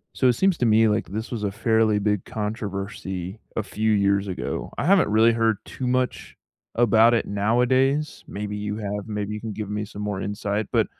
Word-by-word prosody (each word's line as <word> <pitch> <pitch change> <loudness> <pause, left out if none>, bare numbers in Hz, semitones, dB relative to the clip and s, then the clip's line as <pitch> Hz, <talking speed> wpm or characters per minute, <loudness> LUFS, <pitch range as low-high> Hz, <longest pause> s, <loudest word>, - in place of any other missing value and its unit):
So 130 - +3
it 125 - +5
seems 190 +6 +2
to 125 - +2
me 110 +1 +5
like 105 -4 0
this 110 +5 -5
was 115 -4 -3
a 100 - 0
fairly 110 +1 +2
big 105 -2 0
controversy 100 -2 -5 0.2
a 110 - -1
few 110 +2 -1
years 100 -1 +2
ago. 95 - -4
I - - -1
haven't 190 - +4
really 110 +2 +5
heard 115 -2 +1
too 130 - -5
much 125 -6 -1 0.4
about 115 0 +5
it 115 - 0
nowadays. 125 +8 +1
Maybe 105 +1 -5
you 105 0 -3
have, 105 -1 -4
maybe 105 -1 -3
you 105 - -5
can 110 -2 -5
give 105 -1 -5
me 105 0 -2
some 105 0 -8
more 100 -2 -3
insight, 105 0 -2
but - - +3
105 Hz, 200 wpm, -24 LUFS, 100-115 Hz, 0.4 s, it